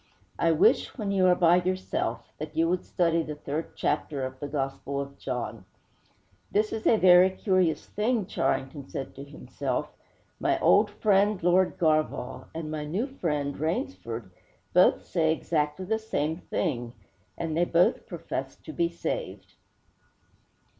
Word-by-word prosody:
'I 165 -1 +3
wish, 160 - +3
when 210 -4 -2
you 190 -2 +3
are 180 - +5
by 175 -1 +5
yourself, 185 +1 -2
that 155 +1 -7
you 165 +1 +3
would 180 +1 0
study 170 -2 +1
the 155 -2 -5
third 150 +2 -5
chapter 145 -2 -1
of 130 0 -7
the 145 - -4
Gospel 140 0 -3
of 140 0 -6
John!' 125 -1 -4 0.9
'This 215 +1 +1
is 220 0 -2
a 225 - +5
very 180 -1 +7
curious 185 -3 +1
thing,' 220 0 0
Charrington 135 -4 -2
said 135 - -5
to 140 - -9
himself. 145 +1 -4 0.5
'My - - +1
old - - +5
friend, 205 -2 +2
Lord 180 +1 +3
Garvagh, 155 -6 0
and 160 -1 -4
my 155 -1 -3
new 180 - -1
friend, 150 - -2
Rainsford, 115 - -3 0.4
both - - +4
say 160 -2 +1
exactly 160 +2 -1
the 220 +3 0
same 160 -8 -2
thing; 120 -10 -3 0.4
and 165 -2 -3
they 170 - +3
both 175 +1 +2
profess - - -5
to - - -9
be 340 0 +1
saved.' - - -5
165 Hz, 150 wpm, -27 LUFS, 145-185 Hz, 0.9 s, very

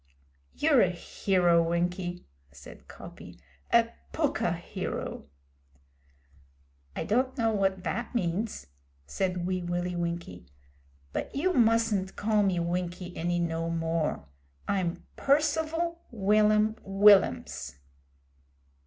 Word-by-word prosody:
'You're 290 -5 +4
a 185 - +4
hero, 175 -1 +2
Winkie,' 175 +1 -2 0.3
said 70 -1 -14
Coppy - - -12 0.3
'a - - +5 0.2
pukka - - 0
hero!' - - -5 1.7
'I - - -2
don't 255 +5 0
know 225 -2 +2
what 195 -2 +1
vat 235 +1 -3
means,' 200 - -2 0.4
said 180 - -2
Wee 185 0 -1
Willie 175 +1 -2
Winkie, 170 - -4 0.7
'but - - -4
you 360 +7 +1
mustn't 225 - +2
call 215 0 +1
me 190 -3 +1
Winkie 175 +1 -3
any 175 +1 -1
no 165 -1 -1
more. 165 - -1 0.4
I'm 185 -4 -1
'Percival 320 +4 +1
Will'am 215 0 +3
Will'ams.' 195 - +3
190 Hz, 100 wpm, -28 LUFS, 175-225 Hz, 1.7 s, a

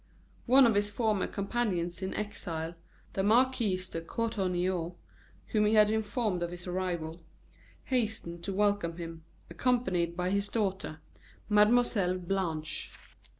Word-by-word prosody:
One 260 +2 +8
of 230 - +4
his 205 0 +2
former 210 -2 0
companions 195 -5 -2
in 190 - -3
exile, 170 -6 -3 0.4
the 195 - 0
Marquis 225 -2 +3
de 165 - -3
Courtornieu, 185 -4 -1 0.6
whom 210 -2 +2
he 215 - +3
had 210 0 +6
informed 220 -3 0
of 175 - -1
his 175 0 -7
arrival, 175 -3 -3 0.6
hastened 220 -9 -1
to 200 - -2
welcome 200 -4 +1
him, 165 -1 -7 0.3
accompanied 180 -6 +1
by 180 +1 0
his 200 0 +1
daughter, 190 -7 -2 0.5
Mlle. 210 -3 +4
Blanche. 170 -4 -2
195 Hz, 125 wpm, -30 LUFS, 175-215 Hz, 0.6 s, One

